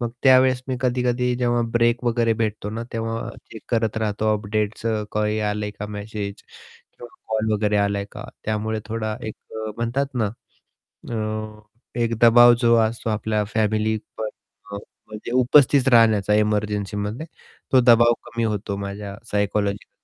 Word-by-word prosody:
मग 120 -1 -2
त्यावेळेस 130 -1 +5
मी 130 - -1
कधी-कधी 125 -1 0
जेव्हा 120 -1 +1
ब्रेक 120 +1 +2
वगैरे 115 -1 +2
भेटतो 105 -2 -2
ना, 115 +2 -4
तेव्हा 115 +1 -3 0.2
चेक 110 - -10
करत 115 -2 0
राहतो 110 0 0
अपडेट्स 105 +1 -2 0.3
काही 105 0 0
आले 105 0 -3
का 105 0 -7
मेसेज 105 -1 -5 0.6
किंवा 120 - -9 0.2
कॉल 110 0 0
वगैरे 105 0 +1
आलाय 100 0 0
का? - - -8 0.2
त्यामुळे 110 0 -2
थोडा 110 -1 -3
एक 110 - -5 0.2
अ, 110 0 -4
म्हणतात 130 +4 -2
ना 110 -5 0 0.8
अ, - - -3 0.9
एक 115 0 +1
दबाव 120 +1 +8
जो 115 0 +5
असतो 110 0 -2
आपल्या 105 0 -1
फॅमिली 110 0 +1 0.2
पण 110 - -2 0.4
अ - - -3
म्हणजे 105 +2 -10
उपस्थित 130 +1 +4
राहण्याचा 110 -3 +5
एमर्जन्सीमध्ये 105 +3 -1 0.5
तो 130 - +7
दबाव 120 -1 +6
कमी 115 0 -3
होतो 105 -2 -2
माझ्या 100 0 -6
सायकॉलॉजिकल 100 0 -1
110 Hz, 145 wpm, -22 LUFS, 105-120 Hz, 0.9 s, दबाव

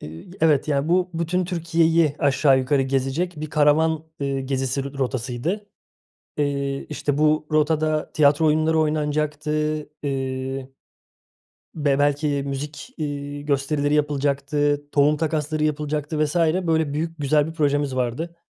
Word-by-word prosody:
Eee, 80 +2 -9 0.2
evet, 155 -3 +3
ya, 145 0 0
bu 180 +1 +2
bütün 170 +2 0
Türkiye'yi 165 -3 +2
aşağı 140 -2 +3
yukarı 135 +1 +1
gezecek 135 +7 -1
bir 155 - -5
karavan, 155 +1 +3 0.2
eee, 140 -1 -1
gezisi 135 0 -2
r 140 0 -7
rotasıydı. 130 - -2 0.7
Eee, 140 -1 -1
işte, 145 -1 -2
bu 155 0 +2
rotada 155 0 +1
tiyatro 150 +1 +4
oyunları 155 +1 +2
oynanacaktı, 150 -1 0 0.5
eee, 135 -1 -3 1.0
be 145 -3 +1
belki 145 0 +1
müzik, 145 - -6
iii, 145 -2 -5
gösterileri 145 +1 0
yapılacaktı, 145 0 0
tohum 145 +1 +4
takasları 155 -1 -1
yapılacaktı 150 0 -1
vs. 150 +3 -3 0.3
Böyle 160 -3 +1
büyük, 165 +2 -3
güzel 145 +1 +2
bir 160 - -6
projemiz 145 -3 0
vardı. 130 +8 -2
150 Hz, 125 wpm, -23 LUFS, 140-155 Hz, 1.0 s, tiyatro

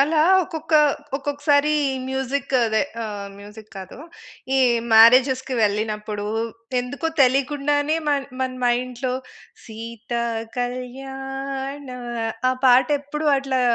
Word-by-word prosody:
అలా 305 +2 +3 0.2
ఒక్కొక్క 320 -1 -4 0.4
ఒక్కొక్కసారి 290 +1 +1 0.4
మ్యూజిక్ 265 +1 -2
అదే 220 -1 +1 0.2
ఆహ్, 205 -2 -5
మ్యూజిక్ 210 +1 -12
కాదు. 190 +4 -9 0.6
ఈ - - +4 0.3
మ్యారేజెస్‌కి 255 +4 +6
వెళ్ళినప్పుడు 210 0 -1 0.5
ఎందుకో 275 +6 -3
తెలియకుండానే, 290 +3 +1
మన 285 -1 +2 0.2
మన 260 0 -1
మైండ్‌లో, 250 +1 -1 0.5
సీతా 230 +1 -5 0.4
కళ్యాణా, 270 +2 -5 0.5
ఆ - - +1
పాట 250 0 +6
ఎప్పుడు 300 +2 -4
అట్లా 270 -1 -1
260 Hz, 95 wpm, -22 LUFS, 235-280 Hz, 0.6 s, మ్యారేజెస్‌కి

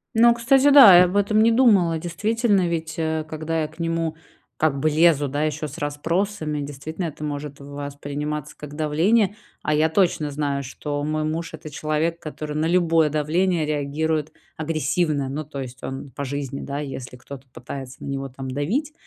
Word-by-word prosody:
Ну, 235 +1 +6
кстати, 265 +4 +4
да, 245 -11 +10
я 180 - +8
об 180 +2 -3
этом 205 +1 +3
не 230 +1 +5
думала. 200 -10 +4
Действительно, 200 +4 +1
ведь, 160 -2 -3
э, 160 -1 -1
когда 160 +1 -2
я 155 - -1
к 160 - -20
нему 165 -1 -1 0.4
как 155 -3 +1
бы 155 - +2
лезу, 155 -2 +4
да, 145 +3 -1
ещё 155 0 -2
с 145 - -10
расспросами- 155 +2 -2
действительно, 145 +5 -5
это 155 -1 -6
может 145 -1 -5
восприниматься 145 +1 -5
как 150 -1 -9
давление. 180 +8 +2 0.3
А 155 - +1
я 155 +1 +3
точно 170 -3 +1
знаю, 140 -1 -2
что 145 +2 -4
мой 155 0 -1
муж- 160 +2 -3
это 155 0 -8
человек, 155 +3 -1
который 155 -2 -6
на 155 - +1
любое 165 -3 +3
давление 160 +3 +1
реагирует 155 +1 -1 0.2
агрессивно. 155 -2 0
Ну, 150 +3 -3
то 140 -2 -6
есть 130 -1 -9
он 135 +1 -6
по 140 +3 -5
жизни, 140 0 -4
да, 140 +1 -4
если 130 -3 -6
кто-то 135 +1 -11
пытается 130 +1 -8
на - - -6
него 135 0 -3
там 130 0 -7
давить, 220 - -1
155 Hz, 180 wpm, -23 LUFS, 145-170 Hz, 0.4 s, да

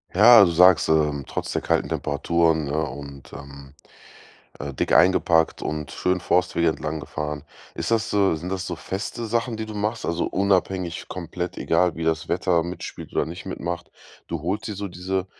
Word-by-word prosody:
Ja, 110 0 +9
du 85 - +1
sagst, 90 0 +6
ähm, 75 -3 +1
trotz - - -4
der - - -1
kalten - - 0
Temperaturen, 80 +2 +1
ne, 70 +2 -2
und, 70 -3 -6
ähm, 70 -1 -11 0.9
äh, 70 0 -4
dick - - -1
eingepackt 85 -3 +4
und 75 -3 -4
schön 90 +5 0
Forstwege 85 -1 +1
entlang 80 0 -3
gefahren. 75 +1 -5 0.3
Ist - - -3
das 110 -1 +1
so 100 -5 +2
sind 85 +4 -6
das 95 -2 -3
so - - -4
feste 110 +4 -5
Sachen, 115 +1 -1
die 110 - -4
du 110 - -8
machst, 105 +2 -2
also 85 0 -1
unabhängig 95 -2 0
komplett 90 +1 -5
egal, 85 +1 +1
wie 80 - -3
das 80 0 0
Wetter 85 -1 +1
mitspielt 85 0 -7
oder - - +1
nicht 85 +4 -8
mitmacht? 85 -3 -5 0.4
Du 85 -3 -3
holst 100 +7 -3
dir 105 - -4
so 100 - -4
diese 95 +1 -3
85 Hz, 180 wpm, -24 LUFS, 80-95 Hz, 0.9 s, Ja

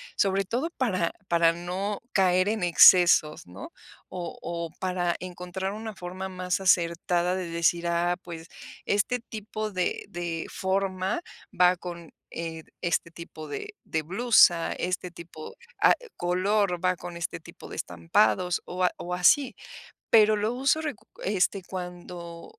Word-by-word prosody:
Sobre 195 0 +2
todo 245 - -2
para 185 -10 0 0.2
para 170 -1 +4
no 185 +4 -4
caer 185 0 +3
en 215 -3 -1
excesos, 175 -2 +6
¿no? 90 - -10 0.4
O 175 -2 -6
o 170 -1 -4
para 180 -2 0
encontrar 185 +1 -5
una 220 0 -6
forma 185 +1 -6
más 185 0 -2
acertada 175 0 +2
de 185 -2 -3
decir: 170 +1 +1
"Ah, 170 +1 +1
pues, 165 -1 -8 0.4
este 205 +5 +1
tipo 215 -1 -6
de 185 -1 -2
de 170 -2 -4
forma 190 - -1 0.4
va 180 0 +6
con, 170 -2 -8 0.2
eh, 165 -1 -5 0.2
este 170 -1 -1
tipo 160 -2 -10
de 415 - -6
de 160 - -2
blusa, 180 -1 +4
este 180 0 -3
tipo, 165 -2 -10 0.3
ah, - - +7 0.2
color, 185 +1 +1
va 185 0 +3
con 175 0 -8
este 170 - -4
tipo - - -13
de - - -7
estampados 105 - +1
o 180 +1 -3
a 180 - +4
o 180 - -5
así. 210 +10 +4 0.6
Pero 215 -1 +6
lo 215 +2 0
uso 275 +5 +2
recurre 225 -8 -5
este, 190 +1 +1
cuando 180 - -8
180 Hz, 145 wpm, -27 LUFS, 170-195 Hz, 0.6 s, ah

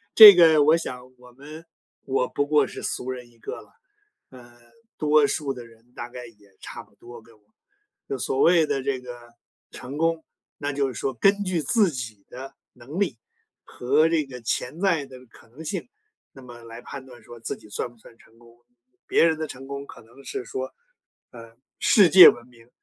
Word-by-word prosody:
这 215 -3 +12
个 160 -4 +6
我 155 +3 +4
想 125 -6 -7
我 125 0 -18
们 150 +6 -12 0.4
我 130 -1 0
不 145 - -2
过 150 -2 +3
是 - - -9
俗 130 +1 -4
人 125 -1 -9
一 120 - -26
个 - - -8
了， - - -22 0.6
呃， 120 -2 -16 0.4
多 150 -1 +3
数 140 -3 -3
的 125 -2 -10
人 115 +1 -22
大 120 - -7
概 125 0 -10
也 105 -4 -22
差 - - -9
不 - - -23
多 120 -1 -13
跟 115 0 -21
我 105 - -31 0.6
就 135 - -4
所 130 +3 -3
谓 170 +1 +4
的 135 -2 -2
这 130 -1 -3
个 120 -1 -12 0.4
成 135 +4 -9
功， 165 0 0 0.3
那 145 0 -3
就 140 -1 -1
是 130 - -6
说 135 - -3
根 195 - +2
据 185 -4 -2
自 190 - +2
己 115 -7 -8
的 130 +2 -10 0.2
能 130 +9 -9
力 135 - -1 0.5
和 140 +6 +1
这 165 -2 0
个 130 -2 -10
潜 125 +6 -3
在 175 -7 +1
的 130 -1 -13
可 - - -20
能 140 +7 -12
性， 190 +7 -5 0.4
那 135 - -15
么 120 -2 -13
来 115 +1 -11
判 135 +1 -10
断 125 -3 -15
说 120 +2 -13
自 - - -5
己 - - -18
算 105 +4 -4
不 120 - -24
算 115 +1 -19
成 115 0 -24
功。 115 0 -20 0.5
别 - - +3
人 160 -1 +1
的 155 - -3
成 135 -1 -11
功 140 0 -7
可 - - -14
能 120 +5 -19
是 125 - -6
说， 130 +2 -6 0.6
呃， 115 -2 -14 0.2
世 200 -5 +5
界 180 +3 +10
文 120 - -5
明， 120 -1 -21
130 Hz, 220 characters per minute, -24 LUFS, 120-155 Hz, 0.6 s, 这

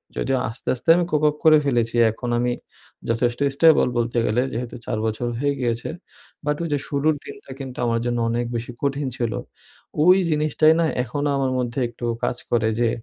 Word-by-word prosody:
যদিও 135 -1 0
আস্তে, 115 - -9
আস্তে 130 +5 -5
আমি 175 0 +1
কোপআপ 150 0 +2
করে 155 -1 +7
ফেলেছি 120 -4 +1 0.2
এখন 120 +2 -6
আমি 125 0 +1 0.6
যথেষ্ট 120 +1 0 0.2
স্টেবল 160 -3 +5
বলতে 120 0 -1
গেলে। 120 +4 +1
যেহেতু 120 +1 -4
৪ - - -2
বছর 110 +2 -2
হয়ে 145 +1 +1
গিয়েছে। 120 -2 -1 0.6
বাট 150 0 +1
ওই 170 - -2
যে - - +2
শুরুর 150 +2 +1
দিনটা - - -11
কিন্তু 130 -2 -7
আমার 115 0 +1
জন্য 120 0 0
অনেক 120 +1 -1
বেশি 115 +1 -4
কঠিন 140 0 -1
ছিল। 115 -2 -1 0.7
ওই 180 +3 +7
জিনিসটাই 155 +1 +3
না 165 - +3 0.2
এখনো 145 +3 -2
আমার 135 -1 0
মধ্যে 120 +1 -2
একটু 120 +1 -8 0.2
কাজ 120 - 0
করে 115 -2 +2
যে, 120 - +3
125 Hz, 185 wpm, -22 LUFS, 120-150 Hz, 0.7 s, করে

